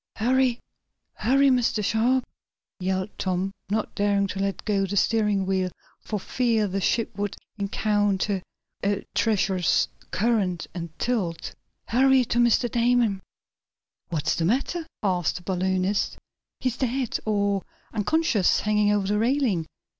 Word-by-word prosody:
"Hurry! 250 +2 +2 0.6
Hurry, 275 +3 +3
Mr. 240 -5 +2
Sharp!" 245 +5 +2 0.6
yelled 190 +2 -1
Tom, 190 0 -1 0.2
not 215 +1 -1
daring 200 -1 +2
to 195 - -4
let 195 0 -2
go 195 -2 +1
the 200 +2 -2
steering 210 -3 +2
wheel, 185 -1 0 0.3
for 210 - -4
fear 225 0 +1
the 195 +1 -2
ship 230 +2 0
would 205 -1 -2 0.2
encounter 205 -1 0 0.4
a 200 0 0
treacherous 190 -5 +2 0.2
current 200 -5 0
and 170 -1 -5
tilt. 195 -10 -2 0.3
"Hurry 260 +1 +4
to 235 - 0
Mr. 240 +1 +4
Damon!" 235 -4 +2 0.9
"What's 160 -4 0
the 165 - -1
matter?" 280 - 0 0.2
asked 180 -4 +1
the 180 - -7
balloonist. 185 +2 0 0.4
"He's 255 -2 -1
dead 255 -1 -1
or 200 -2 +1 0.3
unconscious 225 - +2
hanging 210 -1 +2
over 205 -2 +1
the 210 +2 +1
railing. 230 - +1
205 Hz, 130 wpm, -25 LUFS, 190-240 Hz, 0.9 s, Hurry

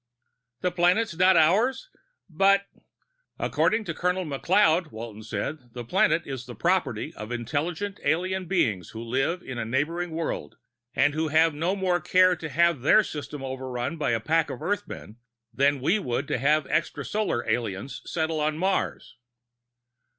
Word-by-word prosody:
"The 180 - 0
planet's 180 +3 +2
not 185 +1 +5
ours? 225 - +3 0.4
But 195 +3 +3 0.4
?" - - -50
"According 220 +1 +1
to 170 - -4
Colonel 180 +2 -1
McLeod," 165 +2 +2
Walton 110 -1 -8
said, 110 +8 -4
"the 120 -1 -6
planet 155 +7 +2
is 130 -2 -6
the 120 - -8
property 170 - 0
of 110 +2 -8
intelligent 160 - -3
alien 185 +5 0
beings 110 - 0
who 115 - -5
live 135 +9 -1
on 125 -2 -6
a - - -1
neighboring 150 +9 -1
world, 160 - -4 0.4
and 145 - +3
who 155 +1 -1 0.2
no 165 +6 -1
more 185 -3 0
care 185 +2 +4
to 160 -1 -7
have 170 -1 +2
their 215 - +5
system 150 -4 -6
overrun 130 +2 -4
by 150 - -1
a 115 -1 +1
pack 160 +8 +1
of - - -6
Earthmen 200 - -4 0.4
than 140 +1 +2
we 175 +10 +2
would 130 -4 -2
to - - 0
have 150 +4 +3
extrasolar 160 - -1
aliens 115 +2 -2
settle 160 -1 -2
on 155 0 0
Mars." 190 -7 -1
155 Hz, 155 wpm, -26 LUFS, 130-185 Hz, 0.4 s, not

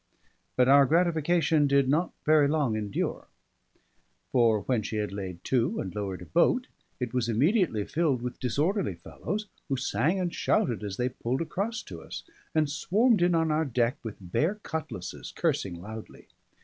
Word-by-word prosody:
But 125 -1 +4
our 140 0 +7
gratification 165 -2 +3
did 140 -1 +3
not 160 +6 +1
very 150 -2 +5
long 145 -6 +1
endure; 105 -2 -3 1.0
for 115 -4 +4
when 120 +2 0
she 110 - -5
had 105 -2 -1
laid 95 -3 -6
to 125 -2 +1
and 95 - -4
lowered 95 -4 -4
a - - -10
boat, 210 - +2 0.3
it 125 -3 -3
was 125 -2 0
immediately 135 - +2
filled 145 -6 0
with 125 - -5
disorderly 150 - 0
fellows, 200 - -5 0.2
who 135 - 0
sang 160 +7 0
and 175 -2 -1
shouted 115 -4 +1
as 100 -2 -4
they 125 +1 0
pulled 130 +3 -2
across 205 +7 -3
to 85 -3 -9
us, - - -8 0.3
and 155 -1 +3
swarmed 210 - +2
in 175 0 +4
on 160 -1 +2
our 155 +1 +2
deck 120 -4 0
with 110 -3 -7
bare 150 - 0
cutlasses, 155 - -5
cursing 85 -3 -1
loudly. 110 +4 -9
135 Hz, 165 wpm, -28 LUFS, 110-165 Hz, 1.0 s, our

